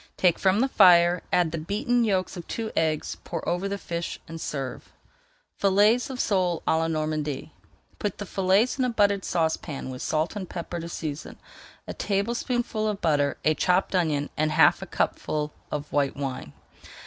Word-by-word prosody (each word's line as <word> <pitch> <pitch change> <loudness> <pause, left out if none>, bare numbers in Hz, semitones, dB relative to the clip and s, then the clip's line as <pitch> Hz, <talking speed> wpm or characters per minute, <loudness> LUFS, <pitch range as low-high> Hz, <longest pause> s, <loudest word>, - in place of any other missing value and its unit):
Take 180 -3 +3
from 195 +3 +3
the 265 - +3
fire, 175 -6 +6
add 175 -3 +2
the 165 - -3
beaten 235 - 0
yolks 190 -3 0
of 175 -2 -8
two 225 -1 -4
eggs, 155 -2 0
pour 165 -2 -5
over 175 +3 0
the 200 - -2
fish, 170 -3 -4
and 165 0 -8
serve. 135 -3 -5 0.7
FILLETS 210 +6 +4
OF 260 -2 -6
SOLE 180 -7 +1
À 160 - +3
LA 165 - 0
NORMANDY 155 -2 -2 0.5
Put 205 -3 -2
the 205 - -5
fillets 195 +8 +2
in 260 - +3
a - - +1
buttered 205 -4 +2
saucepan 160 -4 -2
with 125 - -7
salt 160 +5 -1
and 190 -4 -5
pepper 175 0 -5
to 170 0 -6
season, 155 -3 -5 0.5
a - - -4
tablespoonful 230 +2 -1
of 210 -2 -2
butter, 145 -5 +1
a 155 - +5
chopped 180 +5 +1
onion, 155 -5 0
and 155 0 +1
half 155 -1 +5
a - - -6
cupful 150 0 -1 0.2
of 150 -1 -4
white 140 -2 +1
wine. 130 - -5
175 Hz, 175 wpm, -26 LUFS, 155-200 Hz, 0.7 s, fire